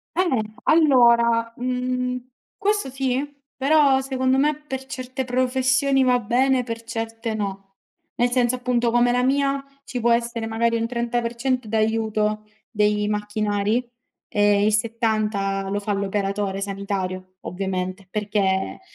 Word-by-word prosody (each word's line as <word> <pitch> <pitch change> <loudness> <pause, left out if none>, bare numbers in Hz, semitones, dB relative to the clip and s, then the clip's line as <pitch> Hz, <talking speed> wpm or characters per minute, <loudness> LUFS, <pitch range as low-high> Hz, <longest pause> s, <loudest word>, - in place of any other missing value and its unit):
Eh, 365 - +3 0.4
allora, 235 -6 +4
mhmm, 250 0 -2 0.4
questo 410 -7 0
sì, 265 0 -1 0.3
però, 275 -1 +4
secondo 260 0 0
me, 300 +2 +2
per 265 -1 -5
certe 260 0 -5
professioni 260 +2 +2
va 250 -1 +3
bene, 250 +3 +2
per 230 -1 -6
certe 225 0 -4
no. 195 -2 -4 0.5
Nel 245 0 +1
senso, 245 -1 +2
appunto, 245 -2 0
come 240 0 +3
la 250 +1 +1
mia, 275 +1 +1 0.2
ci 250 - -4
può 235 +1 +2
essere, 235 -1 0
magari, 230 +1 +1
un 230 0 -1
30% 240 +1 -1
d'aiuto 215 -1 0 0.2
dei 210 -1 +1
macchinari 210 +2 -1 0.4
e 205 0 +3
il 215 - +2
70 215 -4 0
lo 205 +1 -1
fa 205 0 -2
l'operatore 195 0 -1
sanitario, 190 -2 -4
ovviamente, 185 0 -4
perché, 200 -2 -1
235 Hz, 125 wpm, -23 LUFS, 210-255 Hz, 0.5 s, allora